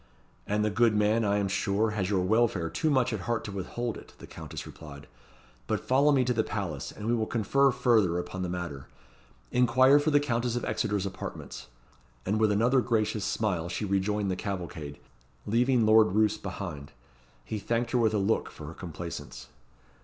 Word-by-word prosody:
"And 105 +1 +1
the 105 - 0
good 115 +1 +3
man, 105 +2 +2
I 100 -1 +2
am 100 -1 0
sure, 100 +3 0
has 100 -3 -2
your 95 -3 +1
welfare 100 -4 +1
too 160 - 0
much 130 -4 +2
at 110 - -2
heart 120 -1 0
to 105 - -6
withhold 110 +4 -4
it," - - -16
the - - -11
Countess - - -8
replied. 70 -3 -11 0.6
"But - - -2
follow 140 +3 +4
me 135 -3 +3
to 125 0 0
the 110 -1 +1
palace, 95 -11 -4
and 105 - -9
we 115 - +1
will 110 -2 0
confer 135 +5 +2
further 110 -9 +2
upon 95 +1 -4
the 90 - -2
matter. 85 -7 -5 0.6
Inquire 130 +3 +5
for 145 +2 +1
the 145 -1 +4
Countess 120 -4 -1
of 120 - -2
Exeter's 105 -2 -1
apartments." 65 -9 -7 0.6
And 105 +3 0
with 110 -1 +3
another 120 +6 +3
gracious 110 -3 0
smile, 90 -7 -1
she 105 - -3
rejoined 100 +1 0
the - - -1
cavalcade, 85 -7 -5 0.5
leaving 120 +2 +2
Lord 110 -2 +5
Roos 105 0 +3
behind. 85 -7 -7 0.5
He 105 - -4
thanked 115 +3 -1
her 125 - +2
with 110 -2 +2
a - - +2
look 100 +3 0
for 75 - -11
her 80 - -7
complaisance. 85 -1 -8
105 Hz, 190 wpm, -28 LUFS, 95-120 Hz, 0.6 s, Inquire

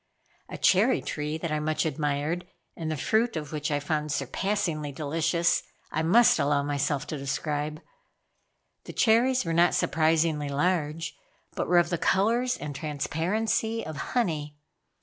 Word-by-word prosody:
A - - -6
cherry 215 +7 +4
tree 150 +1 -3
that 160 0 -4
I 155 - 0
much 155 +1 0
admired, 155 +3 -1 0.3
and 160 -2 -4
the 155 - -2
fruit 220 - +1
of 150 -2 -4
which 150 -1 -2
I 145 -1 0
found 150 +1 -2
surpassingly 155 +1 -1
delicious, 160 +4 +1 0.3
I 160 - 0
must 200 +5 +5
allow 140 0 +2
myself 145 0 -1
to 150 0 -5
describe. 150 +2 -2 1.1
The - - -8
cherries 250 +2 +3
were 165 - -1
not 170 +1 +4
surprisingly 155 -2 +1
large, 155 +1 -1 0.4
but - - -2
were 180 - +4
of 175 0 +3
the 170 - 0
colors 235 +6 +2
and 150 -1 -6
transparency 180 +10 -1
of 155 - -6
honey. 150 - -2
155 Hz, 150 wpm, -27 LUFS, 150-180 Hz, 1.1 s, must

